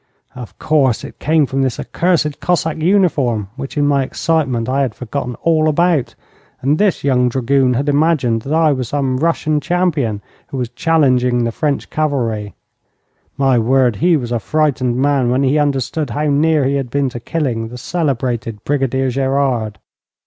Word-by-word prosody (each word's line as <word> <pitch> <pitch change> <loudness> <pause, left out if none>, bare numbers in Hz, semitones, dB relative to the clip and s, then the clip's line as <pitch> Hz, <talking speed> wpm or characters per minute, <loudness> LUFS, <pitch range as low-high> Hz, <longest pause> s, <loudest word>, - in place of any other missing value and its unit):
Of 125 -3 -10
course, 135 -6 +1
it - - -10
came 155 0 +2
from 135 +1 -2
this 130 -2 -1
accursed 165 -5 0
Cossack 165 -2 0
uniform 145 - +1
which, 135 +2 -7
in 145 - +2
my 140 -1 +2
excitement, 130 -6 -1
I 135 +2 0
had 130 -5 -1
forgotten 125 0 -4
all 155 -1 +3
about, 165 -3 +1 0.4
and 145 +4 0
this 205 -2 +1
young 125 -3 +2
dragoon 130 +1 +1
had 140 +4 -1
imagined 145 -6 +2
that 135 - -7
I 160 -1 +3
was 130 -3 -4
some 135 -3 -1
Russian 155 0 0
champion 150 - -1 0.2
who 135 - -6
was 125 -2 -2
challenging 125 -3 +2
the 115 - -1
French 145 +4 -2
cavalry. 120 -9 -2 0.8
My 135 -3 +3
word, 125 -1 +2
he 170 -1 +3
was 120 -4 -5
a 120 - 0
frightened 130 -1 0
man 135 -2 +2
when 130 +3 +1
he 140 +3 +2
understood 145 +1 -1
how 145 +6 -2
near 150 0 +2
he 140 +1 +1
had 135 -3 -3
been 140 +1 0
to 120 - -7
killing 120 -5 -2
the 120 +2 -9
celebrated 125 - -2
Brigadier 135 -2 0
Gerard. 130 -5 0
135 Hz, 170 wpm, -17 LUFS, 125-155 Hz, 0.8 s, all